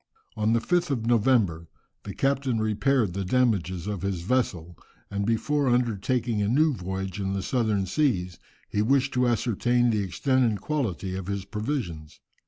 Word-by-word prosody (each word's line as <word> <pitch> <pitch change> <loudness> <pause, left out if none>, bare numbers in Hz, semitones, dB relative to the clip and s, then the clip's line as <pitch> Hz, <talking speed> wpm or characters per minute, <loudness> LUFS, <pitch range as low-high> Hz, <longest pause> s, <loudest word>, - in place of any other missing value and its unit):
On 110 +1 +1
the 115 - +3
5th 175 +7 0
of 120 -5 -1
November 110 -8 +2 0.4
the 100 - -6
captain 135 -3 0
repaired 110 0 +1
the 100 +1 -2
damages 95 -6 +1
of 105 -3 -3
his 95 -3 -2
vessel, 90 -7 -1 0.4
and 100 0 -2
before 140 +5 +1
undertaking 120 -1 0
a 100 - +1
new 150 +7 +3
voyage 95 -2 -4
in 95 -1 -2
the 95 -1 -2
southern 110 -6 0
seas, 90 - 0 0.3
he 105 - -1
wished 135 +4 +2
to 125 -1 +2
ascertain 120 +1 +1
the 105 -2 +1
extent 130 +7 +1
and 110 -4 +1
quality 100 - -2
of 95 -1 -5
his 100 -1 -3
provisions. 100 - -4
110 Hz, 165 wpm, -26 LUFS, 95-125 Hz, 0.4 s, the